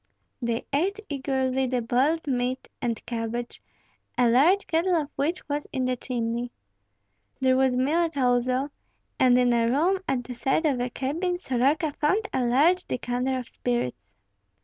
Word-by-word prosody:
They 235 Hz, -1 st, -2 dB
ate 380 Hz, +9 st, +1 dB
eagerly 265 Hz, -2 st, 0 dB
the 250 Hz, 0 st, 0 dB
boiled 270 Hz, +8 st, +1 dB
meat 255 Hz, -1 st, -1 dB
and 235 Hz, -3 st, -2 dB
cabbage, 235 Hz, +1 st, -4 dB, 0.6 s
a 245 Hz, -1 st, +4 dB
large 335 Hz, +11 st, +4 dB
kettle 345 Hz, +3 st, +1 dB
of 300 Hz, -3 st, -1 dB
which 320 Hz, +6 st, -2 dB
was 290 Hz, 0 st, -3 dB
in 260 Hz, -2 st, -1 dB
the 255 Hz, 0 st, 0 dB
chimney. 240 Hz, -1 st, -3 dB, 0.9 s
There 260 Hz, -1 st, +3 dB
was 260 Hz, -1 st, +2 dB
millet 315 Hz, +4 st, +1 dB
also, 255 Hz, +2 st, +1 dB, 0.5 s
and 250 Hz, -1 st, +5 dB
in 245 Hz, -1 st, +3 dB
a 230 Hz, -1 st, +2 dB
room 335 Hz, +9 st, +2 dB
at 250 Hz, -2 st, 0 dB
the 250 Hz, -, -7 dB
side 265 Hz, +6 st, 0 dB
of 275 Hz, -5 st, +2 dB
the 245 Hz, +1 st, -1 dB
cabin 330 Hz, +9 st, -2 dB
Soroka 290 Hz, +1 st, +1 dB
found 385 Hz, +10 st, 0 dB
a 260 Hz, -, +1 dB
large 305 Hz, +10 st, +3 dB
decanter 250 Hz, +2 st, -1 dB
of 250 Hz, -2 st, -5 dB
spirits. 125 Hz, -, -3 dB
260 Hz, 155 wpm, -26 LUFS, 245-300 Hz, 0.9 s, and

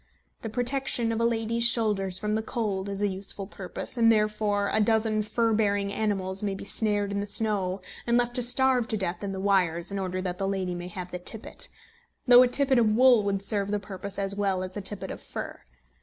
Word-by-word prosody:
The 225 Hz, -, -5 dB
protection 245 Hz, 0 st, 0 dB
of 225 Hz, 0 st, -1 dB
a -, -, +3 dB
lady's 230 Hz, 0 st, 0 dB
shoulders 210 Hz, -6 st, +2 dB
from 210 Hz, +2 st, -2 dB
the 220 Hz, -, 0 dB
cold 205 Hz, -4 st, -3 dB
is 200 Hz, +1 st, -3 dB
a -, -, +3 dB
useful 195 Hz, +1 st, -4 dB
purpose; 195 Hz, +5 st, -6 dB
and 230 Hz, -1 st, +5 dB
therefore 210 Hz, -2 st, +1 dB
a 215 Hz, -, +3 dB
dozen 220 Hz, 0 st, +2 dB
fur 225 Hz, +2 st, 0 dB
bearing 200 Hz, -2 st, +1 dB
animals 195 Hz, -3 st, -1 dB
may 200 Hz, -2 st, -2 dB
be -, -, -8 dB
snared 205 Hz, -1 st, +2 dB
in 200 Hz, -, -2 dB
the 205 Hz, -, -3 dB
snow 200 Hz, -3 st, 0 dB, 0.3 s
and 235 Hz, 0 st, +3 dB
left 240 Hz, 0 st, 0 dB
to -, -, +1 dB
starve 250 Hz, 0 st, +3 dB
to 220 Hz, -, +1 dB
death 180 Hz, -1 st, -3 dB
in 200 Hz, -, -3 dB
the 190 Hz, -, -5 dB
wires, 185 Hz, -3 st, +1 dB
in 200 Hz, -, -3 dB
order 185 Hz, -1 st, -3 dB
that 180 Hz, -1 st, -4 dB
the 195 Hz, -, -1 dB
lady 190 Hz, -2 st, -2 dB
may 175 Hz, 0 st, -6 dB
have 180 Hz, 0 st, -7 dB
the 180 Hz, -, -5 dB
tippet, 215 Hz, +5 st, -5 dB, 0.6 s
though 245 Hz, -1 st, +8 dB
a 255 Hz, -, +5 dB
tippet 265 Hz, 0 st, +2 dB
of 225 Hz, -2 st, +3 dB
wool 250 Hz, -2 st, +6 dB
would 200 Hz, -1 st, -2 dB
serve 200 Hz, -1 st, 0 dB
the 210 Hz, -, 0 dB
purpose 200 Hz, 0 st, -6 dB
as 195 Hz, 0 st, 0 dB
well 195 Hz, -2 st, 0 dB
as 185 Hz, 0 st, -7 dB
a 205 Hz, -, -4 dB
tippet 200 Hz, 0 st, -4 dB
of -, -, -8 dB
fur. -, -, -7 dB
205 Hz, 225 wpm, -27 LUFS, 195-225 Hz, 0.6 s, though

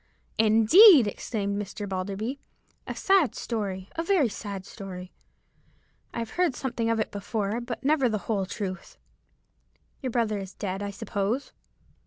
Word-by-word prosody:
"Indeed!" 225 Hz, -, +8 dB
exclaimed 205 Hz, -1 st, -2 dB
Mr. 205 Hz, +1 st, -6 dB
Balderby; 200 Hz, +7 st, -3 dB, 0.5 s
"a -, -, -4 dB
sad 380 Hz, -, +3 dB
story,—a 200 Hz, -, -4 dB
very 335 Hz, -, +2 dB
sad 200 Hz, -2 st, -6 dB
story. 185 Hz, -3 st, -9 dB, 1.0 s
I -, -, -8 dB
have 230 Hz, -1 st, -3 dB
heard 350 Hz, -7 st, +1 dB
something 235 Hz, -4 st, -2 dB
of 230 Hz, -1 st, +1 dB
it 220 Hz, -, -1 dB
before, 205 Hz, +2 st, -2 dB
but 240 Hz, +1 st, -6 dB
never 275 Hz, -3 st, +3 dB
the 215 Hz, -, 0 dB
whole 200 Hz, -4 st, -1 dB
truth. 190 Hz, -2 st, -6 dB, 1.0 s
Your 260 Hz, -, -2 dB
brother 225 Hz, -4 st, 0 dB
is 195 Hz, -1 st, -8 dB
dead, 195 Hz, -1 st, -4 dB
I 205 Hz, -, -3 dB
suppose." 210 Hz, +4 st, -2 dB
215 Hz, 140 wpm, -27 LUFS, 200-245 Hz, 1.0 s, Indeed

